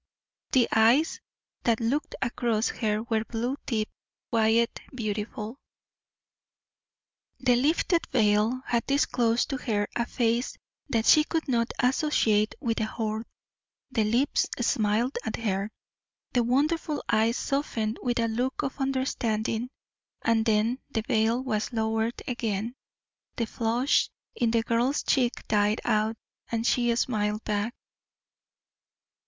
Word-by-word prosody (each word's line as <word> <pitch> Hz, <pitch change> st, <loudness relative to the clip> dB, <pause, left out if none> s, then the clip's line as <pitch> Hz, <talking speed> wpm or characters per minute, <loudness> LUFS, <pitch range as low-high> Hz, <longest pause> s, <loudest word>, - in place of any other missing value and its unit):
The 250 Hz, -3 st, +5 dB
eyes 235 Hz, +8 st, +4 dB, 0.4 s
that 230 Hz, -2 st, +2 dB
looked 245 Hz, +6 st, -1 dB
across 235 Hz, -3 st, 0 dB
at -, -, -14 dB
her 215 Hz, -1 st, 0 dB
were 225 Hz, -2 st, 0 dB
blue 240 Hz, +3 st, -2 dB
deep, 220 Hz, -3 st, 0 dB, 0.4 s
quiet, 230 Hz, +1 st, +2 dB
beautiful. 215 Hz, +1 st, -4 dB, 1.8 s
The 245 Hz, -, +3 dB
lifted 320 Hz, +6 st, +2 dB
veil 220 Hz, +2 st, +2 dB
had 235 Hz, -1 st, 0 dB
disclosed 245 Hz, -3 st, +2 dB
to 270 Hz, -, -1 dB
her 205 Hz, -5 st, -1 dB
a 235 Hz, 0 st, 0 dB
face 235 Hz, +1 st, 0 dB, 0.3 s
that 225 Hz, -2 st, +1 dB
she 305 Hz, -, +7 dB
could 320 Hz, +1 st, -2 dB
not 235 Hz, -3 st, +1 dB
associate 245 Hz, -5 st, +2 dB
with 230 Hz, -2 st, -1 dB
the 220 Hz, -, +1 dB
Horde. 220 Hz, 0 st, -3 dB, 0.6 s
The 225 Hz, -4 st, +2 dB
lips 240 Hz, +7 st, +2 dB
smiled 230 Hz, +2 st, +1 dB
at 220 Hz, -, -2 dB
her 200 Hz, -2 st, -1 dB, 0.6 s
the 245 Hz, -, +3 dB
wonderful 295 Hz, +6 st, 0 dB
eyes 225 Hz, +2 st, +2 dB
softened 235 Hz, -6 st, -1 dB
with 240 Hz, -1 st, 0 dB
a 230 Hz, -, +2 dB
look 250 Hz, +6 st, -1 dB
of 275 Hz, 0 st, -4 dB
understanding, 240 Hz, -4 st, -1 dB, 0.5 s
and 225 Hz, -1 st, +3 dB
then 225 Hz, +4 st, +2 dB
the 225 Hz, -5 st, -2 dB
veil 225 Hz, +3 st, +1 dB
was 215 Hz, -4 st, -1 dB
lowered 225 Hz, +1 st, -1 dB
again. 230 Hz, -2 st, -2 dB, 0.6 s
The 230 Hz, -, 0 dB
flush 235 Hz, +4 st, +1 dB, 0.2 s
in 240 Hz, -3 st, +1 dB
the 225 Hz, 0 st, +2 dB
girl's 240 Hz, +5 st, +1 dB
cheek 250 Hz, -3 st, +1 dB
died 210 Hz, +1 st, +2 dB
out, 215 Hz, +1 st, +1 dB, 0.3 s
and 230 Hz, 0 st, -1 dB
she 240 Hz, -1 st, +2 dB
smiled 215 Hz, -3 st, 0 dB
back. 210 Hz, +2 st, -1 dB
230 Hz, 125 wpm, -27 LUFS, 220-250 Hz, 1.8 s, she